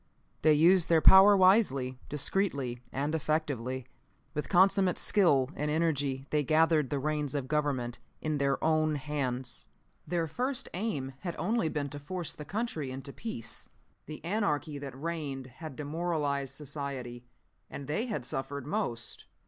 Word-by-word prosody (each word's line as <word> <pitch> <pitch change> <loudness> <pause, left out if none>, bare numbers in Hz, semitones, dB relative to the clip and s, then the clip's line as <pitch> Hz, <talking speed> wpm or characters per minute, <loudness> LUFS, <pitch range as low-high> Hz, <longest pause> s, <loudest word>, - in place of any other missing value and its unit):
They 155 0 +6
used 170 +3 +5
their 165 -1 +6
power 195 +4 +8
wisely, 160 - +4
discreetly, 140 -5 -1
and 145 +5 -1
effectively. 140 -5 -1 0.5
With 150 -1 -3
consummate 190 0 +4
skill 145 -10 +3
and 150 +1 -1
energy 145 -4 0
they 150 -1 +2
gathered 155 -1 +3
the 145 - -1
reins 150 0 -1
of 135 -3 -2
Government 140 -5 -1 0.2
in 155 -2 -1
their 140 -1 +2
own 155 -1 +2
hands. 135 -4 -3 0.4
"Their 170 -2 0
first 255 - -2
aim 160 -10 -2
had 175 -3 -4
been - - -6
only 215 -5 +1
to 145 -1 -3
force 170 +2 -5
the 150 - -9
country 190 - -3
into 135 +2 -7
peace. 115 - -5 0.4
The 155 +1 -8
anarchy 165 -7 -1
that 135 -2 -8
reigned 150 -5 -4 0.2
had 155 -4 -6
demoralized 145 -3 -2
society, 135 -4 -6 0.4
and 140 - -7
they 210 - -1
had 205 - -3
suffered 135 +1 -3
most. 145 - -3
150 Hz, 145 wpm, -30 LUFS, 135-170 Hz, 0.5 s, power